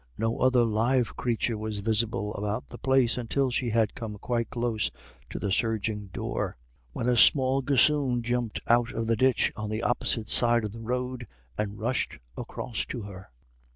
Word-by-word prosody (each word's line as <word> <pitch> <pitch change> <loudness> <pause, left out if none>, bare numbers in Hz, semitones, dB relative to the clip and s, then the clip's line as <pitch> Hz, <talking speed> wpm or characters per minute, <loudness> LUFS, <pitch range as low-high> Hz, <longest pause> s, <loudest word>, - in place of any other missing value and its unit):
No 115 +1 -1
other 130 -1 +4
live 115 +3 +1
creature 115 -2 -1
was 110 -1 -4
visible 105 0 0
about 105 +4 -3
the 120 - -10
place, 130 -2 +2
until 130 +2 0
she 120 0 -1
had 110 -1 +1
come 110 -2 -6
quite 115 +2 -2
close 120 -3 -1 0.4
to - - -6
the 100 - -2
surging 110 -1 0
door, 95 - -4 0.3
when 115 - -3
a 125 - +3
small 130 +2 +5
gossoon 135 -2 +2
jumped 120 -1 -1
up - - +1
out 120 0 +3
of 115 - -2
the 115 0 +2
ditch 130 +2 +2
on 105 -1 -4
the 110 +2 -3
opposite 115 -2 +1
side 120 -1 +4
of 105 - -4
the 115 +2 -9
road 125 +1 -3 0.3
and 105 -1 -3
rushed 120 +4 -1 0.2
across 115 - -4
to 120 - -5
her. 95 -2 -10
115 Hz, 180 wpm, -27 LUFS, 110-125 Hz, 0.4 s, small